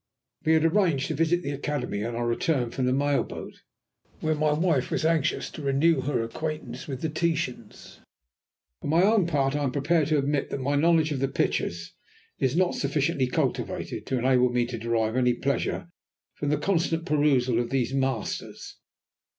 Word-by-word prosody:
We 160 - +3
had 160 0 +3
arranged 165 -6 +2
to - - 0
visit 165 +3 +1
the 140 - -3
Academy 140 -7 -3
on 115 +1 -3
our 120 0 -1
return 120 +1 0
from 130 0 -1
the - - +2
mail 140 +1 +2
boat, - - -8 0.7
where 155 0 0
my 150 0 +1
wife 155 -3 +1
was 160 - -1
anxious 160 -2 +1
to - - -8
renew 140 +2 +2
her 130 -4 -1
acquaintance 155 +7 -5
with 135 -3 -5
the 160 - 0
Titans. 155 -8 -3 0.8
For - - -5
my 165 +4 +4
own 205 -3 +4
part 140 -4 +1
I 145 - 0
am 135 - 0
prepared 145 +3 +1
to 155 -1 +2
admit 140 0 0
that - - -3
my 140 +2 0
knowledge 160 +1 +3
of 140 - -1
the 135 - +1
pictures 85 -9 -2 0.5
is 130 +1 +1
not 185 0 +2
sufficiently 140 -1 0
cultivated - - -2
to 130 - 0
enable 125 0 +3
me 120 0 +1
to 120 -1 -5
derive 115 0 0
any 125 -1 +3
pleasure 140 +5 -1 0.5
from 145 - -3
the 150 - +2
constant 165 0 0
perusal 135 -7 +2
of 120 - -1
these 130 -1 0
Masters. 135 -4 -3
140 Hz, 185 wpm, -26 LUFS, 125-160 Hz, 0.8 s, my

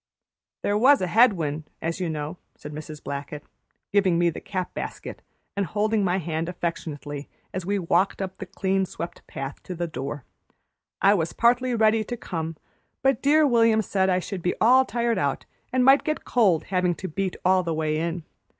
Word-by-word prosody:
"There 205 +1 +1
was 275 +4 +6
a - - 0
head 225 +5 +5
wind, 155 -3 -4
as 165 +2 -3
you 180 -2 -1
know," 155 +2 -4 0.2
said 150 - -9
Mrs. 155 0 -8
Blackett, 140 +1 -5 0.5
giving 195 -4 +3
me 170 0 +3
the - - -8
cap 185 -3 -4
basket, - - -6 0.3
and 200 - +1
holding 210 +3 0
my 185 0 +1
hand 165 -1 -2
affectionately 150 -5 -5 0.2
as 185 -1 -4
we 200 +1 +1
walked 180 +1 +1
up 190 -1 -4
the - - -6
clean 190 -1 0
swept 170 - -7
path 135 +1 -6
to 180 - -7
the 175 +1 -2
door. 145 -3 -5 0.8
"I 200 +1 +7
was 165 -5 -1
partly 245 +1 +3
ready 220 0 +3
to 240 +2 -4
come, 165 -6 -4 0.5
but 270 -2 +3
dear 305 +2 +5
William 230 -4 +4
said 190 -1 +1
I 180 - +3
should 185 0 -4
be 180 - 0
all 255 +4 +6
tired 235 -4 0
out 140 -5 -1 0.3
and 255 0 +2
might 270 +2 +6
get 310 0 -2
cold, 200 -10 +3
havin' 180 -2 0
to 190 - -6
beat 190 +3 -2
all 185 0 +5
the 170 -2 -3
way 155 -1 0
in. 170 +1 -2
185 Hz, 190 wpm, -25 LUFS, 165-220 Hz, 0.8 s, I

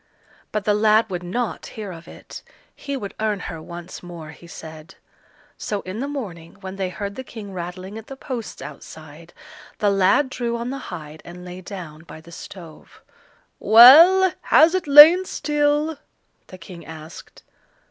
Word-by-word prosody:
But 210 -1 -3
the 210 - +2
lad 215 0 +2
would 180 -1 -4
not 225 +7 -4
hear 210 -3 -6
of 165 -1 -12
it; - - -12 0.3
he 280 -1 -5
would 205 -6 -7
earn 215 -2 -1
her 165 -3 -7
once 175 +2 -10
more, 170 -3 -10
he 170 +2 -16
said. 160 -3 -11 0.6
So 205 -2 -3
in 185 +4 -7
the 275 - -3
morning 190 - -7
when 190 0 -8
they 190 -2 -2
heard 200 +2 -6
the 260 - -8
King 210 -5 -10
rattling 185 +4 -7
at 225 - -15
the 270 - -9
posts 245 -4 -7
outside, 155 +3 -12 0.5
the 205 -1 +1
lad 200 +8 +2
drew 235 -2 -3
on 235 +2 -5
the 275 - -5
hide 155 -3 -9
and 180 +1 -11
lay 180 +1 -9
down 175 -5 -9
by 165 -1 -12
the 165 +2 -16
stove. 170 -2 -13 0.6
"Well, 325 - +8
has 320 +2 +4
it 370 -4 -2
lain 300 +6 +9
still?" 295 -1 -1 0.5
the 185 - -12
king 170 0 -12
asked. 160 0 -12
195 Hz, 170 wpm, -22 LUFS, 170-245 Hz, 0.6 s, lain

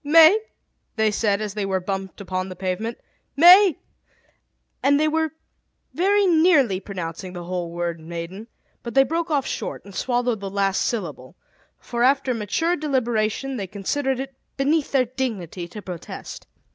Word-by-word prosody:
"Mai 325 +7 +7 0.3
!" - - -49
they 220 -1 +2
said, 205 -1 +1
as 210 -2 -3
they 210 -1 -2
were 190 -1 0
bumped 190 +1 -5
upon 185 -1 -3
the 185 - -7
pavement. 190 +6 -3 0.4
"Mai 360 +3 +8 0.5
!" - - -45
and 285 +1 +4
they 310 - +3
were 320 +1 +1 0.6
very 400 +3 +3
nearly 315 - +4
pronouncing 180 -2 -6
the 175 -1 -6
whole 175 -1 -3
word 170 -1 -3
"maiden;" 170 +6 -7 0.3
but 235 - -7
they 270 - +7
broke 330 +4 -2
off 285 -4 +1
short, - - -5
and 200 - -12
swallowed 245 0 0
the 195 0 -5
last 195 0 0
syllable; 165 - -3 0.4
for 240 -1 -5
after 265 0 +3
mature 245 - 0
deliberation 260 -3 -1
they 195 -3 -4
considered 260 +8 -2
it 270 0 -5 0.2
beneath 290 +2 +1
their 265 -2 +3
dignity 220 - -4
to 205 +4 -9
protest. 180 -3 -8
225 Hz, 160 wpm, -23 LUFS, 190-280 Hz, 0.6 s, Mai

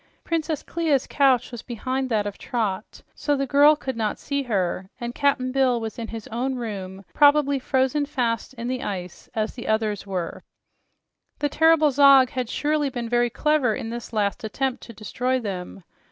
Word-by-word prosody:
Princess 320 -2 -2
Clia's 320 -5 0
couch 265 -4 +2
was 240 -2 -7
behind 255 +2 -3
that 215 -3 +1
of 205 -1 -5
Trot, 215 -4 -3
so 290 - 0
the 275 0 -1
child 290 +3 +5
could 265 - -3
not 220 -2 -1
see 280 0 -2
her, 190 -6 -2
and 240 0 -4
Cap'n 275 -2 +1
Bill 255 -2 +2
was 225 +1 -6
in 230 - -4
his 225 -2 -7
own 255 +4 -2
room, 195 -5 -6
probably 285 -1 +4
frozen 265 +2 +1
fast 245 -3 -2
in 235 0 -5
the 255 0 -2
ice 185 -7 -6
as 215 0 -1
the 240 - -8
others 215 -2 0
were. 180 -4 -4 1.0
The 290 - 0
terrible 320 0 +4
Zog 275 -2 +6
has 255 -3 -3
surely 295 0 0
been 240 -3 -5
very 240 0 +2
clever 280 -3 +1
in 225 - -5
this 235 0 -6
last 210 -2 -1
attempt 260 +4 -2
to 230 - -11
destroy 250 +4 -2
them. 190 -4 -6
245 Hz, 180 wpm, -24 LUFS, 220-280 Hz, 1.0 s, Zog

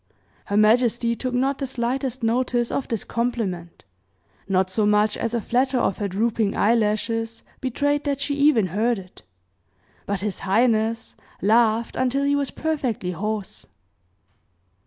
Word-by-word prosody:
Her 200 - -1
majesty 235 +2 +3
took 250 +1 -3
not 270 +2 +1
the 275 - -2
slightest 255 +1 -2
notice 240 +1 +1
of 275 - -2
this 225 -3 -2
compliment, 215 -8 -3 0.6
not 190 -1 +1
so 205 +2 +1
much 210 0 +3
as 230 +1 -2
a - - +1
flatter 255 +4 +1
of 195 - 0
her 205 - -1
drooping 215 +1 0
eye 215 +3 +4
lashes 225 +1 -1 0.2
betrayed 285 +3 0
that 280 -1 -1
she 285 +1 -1
even 280 -7 +4
heard 215 +6 0
it, 185 -1 -12 0.9
but 200 -2 -2
his 205 -2 -3
highness 225 +2 +1 0.2
laughed 225 +2 +2
until 260 +2 +1
he 285 0 +2
was 280 -1 0
perfectly 265 - -2
hoarse. 210 +3 -4
230 Hz, 145 wpm, -23 LUFS, 210-255 Hz, 0.9 s, eye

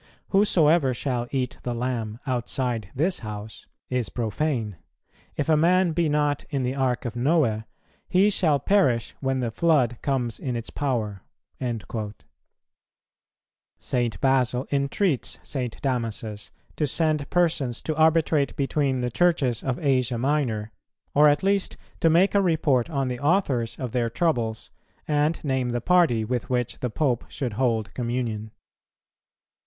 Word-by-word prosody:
Whosoever 165 - +4
shall 120 -2 -2
eat 130 -2 -2
the 120 -1 -3
Lamb 115 -3 -3
outside 120 -4 -2
this 170 +7 +1
House 105 -1 -8 0.2
is 125 -3 -1
profane; 115 - -2 0.6
if 145 - -2
a 160 - +4
man 175 +3 +3
be 165 -1 +1
not 145 -1 +1
in 140 -3 -1
the 125 +1 -1
Ark 130 -2 -1
of 120 -2 -4
Noe, 120 -5 +1 0.4
he 195 +3 +4
shall 160 -7 +3
perish 130 - +2
when 135 -1 -1
the 120 -2 -1
flood 130 -5 +2
comes 125 -5 -1
in 125 -3 -3
its 115 -1 -5
power."[160:1] 110 -3 -4 1.6
St. 120 -3 -2
Basil 130 -1 +2
entreats 140 - 0
St. 125 -5 -4
Damasus 115 -5 -3 0.3
to 150 - 0
send 155 0 +1
persons 160 -9 +1
to 155 - -2
arbitrate 160 -2 +3
between 135 -2 0
the 125 0 -1
Churches 140 -8 +2
of 130 -2 -2
Asia 130 -4 +1
Minor, 120 -5 0 0.4
or 150 +1 +6
at 145 +3 +1
least 195 0 +1 0.2
to 165 - +4
make 175 +5 +4
a 200 - +4
report 155 -8 +2
on 140 -4 -1
the 125 -1 -3
authors 140 - +1
of 125 -3 -4
their 120 -1 0
troubles, 115 -6 -1 0.4
and 150 +2 +1
name 130 -4 0
the 120 0 -1
party 130 -7 +3
with 120 +1 -3
which 125 -1 -1
the 125 - -2
Pope 125 -1 0
should 125 -5 -4
hold 115 -2 0
communion. 115 -3 -3
130 Hz, 140 wpm, -25 LUFS, 120-150 Hz, 1.6 s, or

